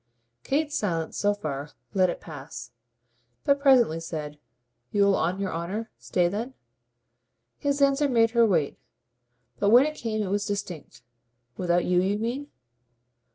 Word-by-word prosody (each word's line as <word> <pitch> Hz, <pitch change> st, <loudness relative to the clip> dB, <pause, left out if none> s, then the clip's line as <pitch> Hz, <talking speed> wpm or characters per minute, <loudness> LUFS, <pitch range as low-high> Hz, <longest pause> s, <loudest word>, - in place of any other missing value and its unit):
Kate's 295 Hz, +2 st, 0 dB
silence, 165 Hz, -, -1 dB
so 205 Hz, -, +2 dB
far, 145 Hz, -6 st, -5 dB, 0.2 s
let 185 Hz, -2 st, +3 dB
it -, -, -4 dB
pass; 135 Hz, -6 st, -9 dB, 0.7 s
but 280 Hz, 0 st, +3 dB
presently 250 Hz, -, +4 dB
said: 150 Hz, -3 st, -6 dB, 0.5 s
"You'll, 200 Hz, -1 st, +4 dB
on 180 Hz, +4 st, 0 dB
your 195 Hz, -3 st, -2 dB
honour, 190 Hz, +7 st, -4 dB
stay 175 Hz, -1 st, +1 dB
then?" 225 Hz, +8 st, -4 dB, 1.0 s
His 285 Hz, 0 st, +1 dB
answer 280 Hz, +1 st, +3 dB
made 230 Hz, -3 st, +3 dB
her 235 Hz, 0 st, +4 dB
wait, 165 Hz, -8 st, 0 dB, 0.8 s
but 205 Hz, -, +3 dB
when 245 Hz, +5 st, +7 dB
it 305 Hz, -, -2 dB
came 220 Hz, -6 st, -2 dB
it 190 Hz, -, -3 dB
was 205 Hz, 0 st, 0 dB
distinct. 175 Hz, -11 st, -5 dB, 0.5 s
"Without 175 Hz, +2 st, +1 dB
you, 180 Hz, 0 st, +3 dB
you 195 Hz, +2 st, 0 dB
mean?" 240 Hz, +6 st, -3 dB
200 Hz, 145 wpm, -26 LUFS, 170-240 Hz, 1.0 s, when